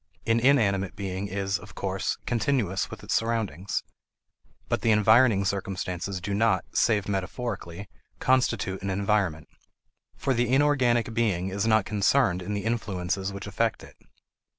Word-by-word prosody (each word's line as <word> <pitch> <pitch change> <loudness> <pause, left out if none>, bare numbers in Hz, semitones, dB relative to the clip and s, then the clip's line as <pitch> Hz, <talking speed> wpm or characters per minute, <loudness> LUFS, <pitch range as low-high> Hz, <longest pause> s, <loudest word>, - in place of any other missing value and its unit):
An 115 0 +3
inanimate 105 -7 +2
being 95 0 -4
is, 95 -1 -2
of 100 0 -13
course, 95 -1 -2
continuous 115 -5 0
with - - -10
its - - -2
surroundings; 110 -6 -1 0.8
but - - -1
the 115 - +1
environing 110 -1 +5
circumstances 95 -1 -3
do 100 +3 -4
not, 100 -3 +2
save 105 -3 +2
metaphorically, 100 -2 -4 0.3
constitute 125 -7 +1
an 100 - -3
environment. 95 -5 0 0.7
For 135 - 0
the 120 0 0
inorganic 130 -5 +2
being 100 -6 0
is 100 +3 -1
not 110 -3 +3
concerned 100 -2 +2
in 105 +3 -4
the 100 0 -4
influences 100 -4 -2
which 100 0 -7
affect 110 +2 -1
it. - - -14
100 Hz, 140 wpm, -26 LUFS, 95-115 Hz, 0.8 s, environing